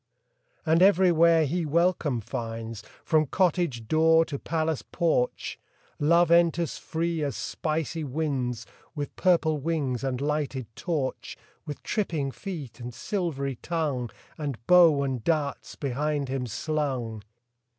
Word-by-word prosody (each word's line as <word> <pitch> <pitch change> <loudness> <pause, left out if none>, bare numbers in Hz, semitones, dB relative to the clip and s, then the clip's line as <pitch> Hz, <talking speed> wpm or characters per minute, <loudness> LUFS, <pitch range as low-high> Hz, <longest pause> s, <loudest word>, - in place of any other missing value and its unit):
And 160 +2 +3
everywhere 170 -4 +5
he 170 +5 -1
welcome 160 -5 +1
finds, 115 0 -5 0.2
From 155 -2 +3
cottage 170 - 0
door 160 +2 +4
to 140 -3 -5
palace 160 -2 -1
porch 160 -7 -1 0.4
Love 170 +3 +4
enters 170 -1 +3
free 165 0 -2
as 140 -5 -2
spicy 160 0 -2
winds, 130 -5 -2 0.3
With 145 -1 -5
purple 165 -4 +2
wings 140 -5 -1
and 130 -2 -1
lighted 145 -3 -1
torch, 155 -7 -3 0.3
With 145 - -6
tripping 160 -10 -1
feet 150 - -7
and 120 0 -6
silvery 140 - -3
tongue, 145 -8 -2 0.3
And 145 -5 -3
bow 170 -6 +6
and 130 -4 -2
darts 150 -4 -1
behind 145 +1 -2
him 130 -2 -2
slung. 130 -4 -2
150 Hz, 120 wpm, -27 LUFS, 130-165 Hz, 0.4 s, bow